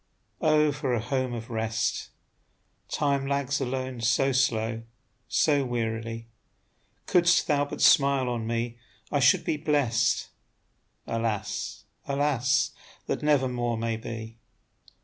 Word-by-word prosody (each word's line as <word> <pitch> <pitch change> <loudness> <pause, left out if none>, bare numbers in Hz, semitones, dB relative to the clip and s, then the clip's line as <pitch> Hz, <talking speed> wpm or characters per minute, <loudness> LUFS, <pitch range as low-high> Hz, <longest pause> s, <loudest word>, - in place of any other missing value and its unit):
Oh, 155 -1 +4
for 135 -3 -1
a - - 0
home 130 +2 -1
of 115 0 -7
rest! 110 0 -1 0.8
Time 140 -2 0
lags 140 0 0
alone 130 -1 -3
so 130 +4 +2
slow, 115 -4 +1 0.5
so 145 -3 +2
wearily; 115 -2 -3 0.8
Couldst 175 0 +4
thou 145 -2 +2
but 145 - -4
smile 140 -2 +5
on 120 -2 -2
me, 115 +1 -2 0.3
I 145 - +2
should 130 0 +4
be 155 - 0
blest. 130 -6 +1 0.8
Alas, 110 -2 -3 0.2
alas! 140 0 +1 0.3
that - - -2
never 145 -3 +3
more 120 -2 -1
may 115 0 -1
be. 115 0 -7
125 Hz, 120 wpm, -27 LUFS, 115-140 Hz, 0.8 s, smile